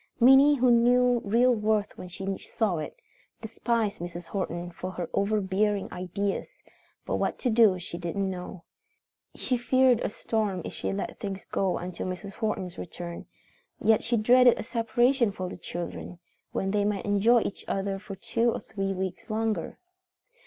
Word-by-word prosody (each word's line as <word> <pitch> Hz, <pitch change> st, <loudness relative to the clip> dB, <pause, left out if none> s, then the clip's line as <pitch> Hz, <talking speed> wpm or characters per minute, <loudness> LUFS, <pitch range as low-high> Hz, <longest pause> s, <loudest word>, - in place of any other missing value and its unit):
Minnie, 270 Hz, +4 st, +7 dB
who 250 Hz, -2 st, +4 dB
knew 245 Hz, +1 st, +4 dB
real 240 Hz, +5 st, +4 dB
worth 215 Hz, -2 st, 0 dB
when 180 Hz, -, -8 dB
she 190 Hz, +2 st, -4 dB
saw 205 Hz, -7 st, -1 dB
it, 155 Hz, -, -6 dB, 0.4 s
despised 225 Hz, -1 st, -1 dB
Mrs. 175 Hz, 0 st, -6 dB
Horton 175 Hz, -2 st, -4 dB
for 185 Hz, +2 st, -6 dB
her 180 Hz, -2 st, -4 dB
overbearing 200 Hz, 0 st, 0 dB
ideas, 185 Hz, +2 st, -4 dB, 0.4 s
but -, -, -1 dB
what -, -, -1 dB
to 250 Hz, -, 0 dB
do 220 Hz, -4 st, +5 dB
she 175 Hz, -1 st, -7 dB
didn't 185 Hz, +3 st, -2 dB
know. 180 Hz, -1 st, -7 dB, 0.7 s
She 250 Hz, -, 0 dB
feared 255 Hz, 0 st, +4 dB
a -, -, -1 dB
storm 205 Hz, -4 st, -2 dB
if -, -, -6 dB
she -, -, -3 dB
let 195 Hz, 0 st, -4 dB
things 195 Hz, -2 st, -5 dB
go 190 Hz, -2 st, 0 dB
until 180 Hz, +1 st, -5 dB
Mrs. 185 Hz, +2 st, -6 dB
Horton's 190 Hz, -5 st, -3 dB
return, 170 Hz, 0 st, -7 dB, 0.5 s
yet 220 Hz, 0 st, +4 dB
she 235 Hz, +1 st, 0 dB
dreaded 245 Hz, +3 st, +6 dB
a -, -, -4 dB
separation 240 Hz, +1 st, +2 dB
for 185 Hz, -2 st, -5 dB
the -, -, -7 dB
children, 175 Hz, 0 st, -6 dB, 0.3 s
when 195 Hz, -, -1 dB
they 205 Hz, 0 st, +1 dB
might 205 Hz, +2 st, -1 dB
enjoy 215 Hz, +4 st, +4 dB
each 200 Hz, -, -4 dB
other 195 Hz, 0 st, -2 dB
for 200 Hz, -1 st, -8 dB
two 230 Hz, +4 st, 0 dB
or -, -, -3 dB
three 195 Hz, -2 st, -3 dB
weeks 190 Hz, +3 st, -5 dB
longer. 215 Hz, -4 st, -2 dB
205 Hz, 165 wpm, -27 LUFS, 185-230 Hz, 0.7 s, Minnie